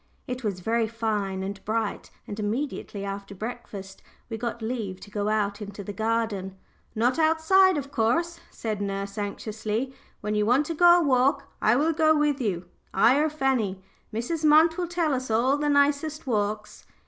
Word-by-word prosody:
It 250 0 -5
was 200 -4 -2
very 225 +3 +1
fine 210 -4 -2
and 195 0 -6
bright, 220 -1 -2 0.2
and 205 - -7
immediately 215 -2 -3
after 200 0 -6
breakfast 200 -3 -7 0.3
we - - -2
got 235 0 -4
leave 220 -5 -3
to 205 - -12
go 205 0 -1
out 210 -1 0
into 205 0 -7
the 205 - -6
garden. 220 -4 -1 0.4
"Not 245 +7 +1
outside, 325 +4 +4
of 280 -1 -5
course," 335 +10 0
said 215 -3 -4
nurse, 200 0 -3
anxiously. 215 +4 -3 0.3
"When 210 - -2
you 210 0 +2
want 250 +7 +3
to 330 - -3
go 350 +2 +6
a - - +1
walk 275 0 +3 0.2
I 215 - +4
will 310 +5 +2
go 315 0 +4
with 295 -2 +1
you 185 -6 -1 0.3
I 230 +8 +4
or 310 +1 +2
Fanny. 255 -10 0 0.3
Mrs. 245 +9 -3
Munt 310 +2 +6
will 355 0 -2
tell 335 -3 0
us 255 -1 -2
all 240 +5 +3
the 295 0 0
nicest 290 +2 +2
walks." 210 -3 -2
230 Hz, 175 wpm, -26 LUFS, 205-290 Hz, 0.4 s, go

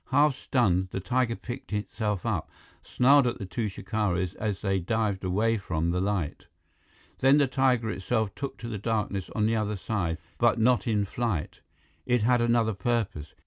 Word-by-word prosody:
Half 145 +1 +4
stunned, 95 -10 +1
the 95 - -4
tiger 115 +5 0
picked 120 0 -8
itself 105 -2 -2
up, - - -1 0.3
snarled 135 +1 +4
at 120 - -1
the 100 - -6
two 110 +4 -2
shikaris 95 -4 -1
as 105 -3 -3
they 95 -2 +1
dived 105 +1 -1
away 105 +5 +1
from 85 -3 -1
the 90 +1 0
light. 95 -6 -2 0.7
Then 135 +2 +5
the 145 - +5
tiger 130 -3 +1
itself 105 +1 -1
took 140 -1 -5
to 120 - -7
the 110 -3 -4
darkness 105 -3 -2
on 105 - +2
the 115 +1 +2
other 105 -1 -1
side, 95 -5 -2 0.2
but 120 -1 +4
not 120 +2 +3
in 105 -3 +1
flight. 105 -6 -3 0.5
It 125 -3 +2
had 120 +1 +3
another 115 -2 +2
purpose. 100 -7 -2
110 Hz, 175 wpm, -27 LUFS, 95-120 Hz, 0.7 s, Then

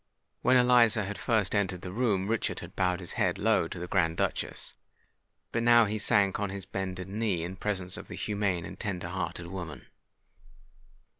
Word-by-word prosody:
When 130 - +5
Eliza 120 -4 +5
had 105 +1 -5
first 110 -6 +1
entered 95 -3 0
the 90 - -5
room, 100 -3 +1
Richard 115 +1 -1
had - - -10
bowed 90 0 +1
his 90 - -6
head - - 0
low - - +2
to - - -7
the 85 - -4
Grand 85 -2 +1
Duchess; - - -2 0.8
but 115 - 0
now 120 0 +6
he 105 +1 -2
sank 100 0 +3
on 105 -2 -1
his 95 -1 -6
bended 95 -1 -4
knee 100 -4 -1
in 90 +2 -5
presence 95 -2 -1
of - - -9
the - - -7
humane 100 -5 -1
and - - -9
tender 90 -5 -3
hearted 85 -1 -4
woman. 85 -3 -7
95 Hz, 180 wpm, -29 LUFS, 90-105 Hz, 0.8 s, now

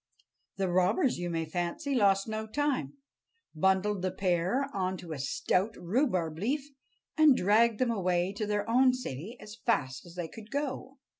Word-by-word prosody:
The 195 -1 0
robbers, 185 - +2
you 175 0 -2
may 165 -1 -1
fancy, 175 - -3
lost 200 -5 +3
no 220 0 -3
time, 290 +3 -1 0.6
bundled 190 +4 +1
the 185 - 0
pair 185 +8 0
on 185 -1 -1
to 175 -3 -9
a 150 - -4
stout 185 - 0
rhubarb 180 - 0
leaf, 275 - -2 0.5
and 300 -4 +7
dragged 220 +3 +4
them 250 0 +1
away 185 -3 0
to 210 +1 -3
their 205 0 -1
own 255 +2 +4
city 215 - -6
as 210 +1 -11
fast 145 - -1
as 170 - -13
they 175 -2 -3
could 215 +6 -12
go. 275 -1 -4
205 Hz, 165 wpm, -30 LUFS, 180-245 Hz, 0.6 s, and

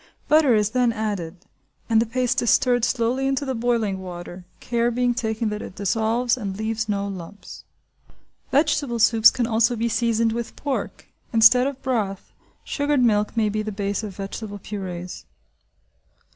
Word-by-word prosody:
Butter 300 -6 +5
is 210 0 +1
then 245 0 +2
added, 195 -5 -4 0.4
and 225 -1 +3
the 230 - -1
paste 250 +2 0
is 235 - +1
stirred 245 -2 +3
slowly 250 +2 0
into 270 +1 -1
the 265 - -2
boiling 225 -5 0
water, 175 0 -8
care 235 0 0
being 245 +1 +1
taken 220 -2 -2
that 210 0 -4
it - - -9
dissolves 225 +5 0
and 200 -5 -5
leaves 220 0 -2
no 200 -1 -1
lumps. 195 +1 -9 0.8
Vegetable 285 -3 +1
soups 225 -1 +6
can 245 - -1
also 230 +1 +2
be 230 +1 -1
seasoned 230 0 +1
with 235 +1 -5
pork. 285 -2 -4 0.3
Instead 235 +2 +6
of 275 -1 -6
broth, 215 -7 -2 0.3
sugared 285 -2 0
milk 210 -1 +1
may 220 -1 +3
be 215 +1 -1
the 215 0 -4
base 200 0 -2
of 205 -4 -7
vegetable 205 +1 -6
purées. 185 -3 -7
225 Hz, 160 wpm, -23 LUFS, 205-245 Hz, 0.8 s, soups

